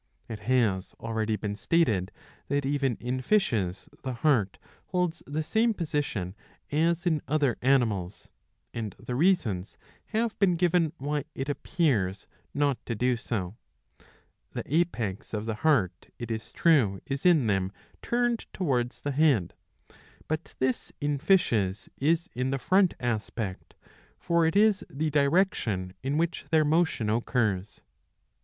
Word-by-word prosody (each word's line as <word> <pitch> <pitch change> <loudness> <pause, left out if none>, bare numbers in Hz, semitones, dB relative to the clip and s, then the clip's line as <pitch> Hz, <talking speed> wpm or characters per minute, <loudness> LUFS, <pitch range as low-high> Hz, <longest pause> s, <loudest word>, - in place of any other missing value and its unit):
^^ - - -4
It 105 - -6
has 105 -7 +1
already 110 -1 -1
been 105 -1 -3
stated 110 - +1 0.4
that 140 0 0
even 135 -3 +1
in 125 +3 -3
fishes 115 - +1
the 130 - -3
heart 120 -8 +2 0.3
holds 180 -2 -1
the 150 +3 -2
same 220 +6 +2
position 145 - -2 0.4
as 165 +3 +1
in 160 -4 +2
other 145 -4 +2
animals; 110 -9 +1 0.4
and 110 -5 -4
the 125 - -6
reasons 125 - +1 0.3
have 225 0 -1
been 185 -3 +4
given 170 -2 +2
why 145 +1 -2
it 135 +2 -3
appears 125 - 0 0.3
not 140 -2 0
to 115 - -1
do 125 +3 +2
so. 105 -4 -4 1.0
The - - -3
apex 125 - -1
of 105 +1 -3
the 115 - -1
heart, 105 - +1
it 120 -1 -5
is 110 0 -4
true, 125 - +3
is 135 0 -3
in 170 -8 +5
them 95 -3 +1 0.3
turned 240 -1 0
towards 125 -9 -1
the 145 - -2
head, 135 - +3 0.7
but 155 +1 -4
this 130 -1 -1
in 145 -1 -1
fishes 115 - +2
is 165 +4 +1
the 130 +2 0
front 185 +6 +3
aspect, 110 -4 -3 0.4
for 170 -1 +2
it 160 - -1
is 210 -1 +4
the 155 +3 -2
direction 140 - +1
in 140 +3 -1
which 165 -3 -1
their 155 -1 +4
motion 160 -7 +2
occurs. 110 -3 -1
135 Hz, 140 wpm, -28 LUFS, 110-160 Hz, 1.0 s, in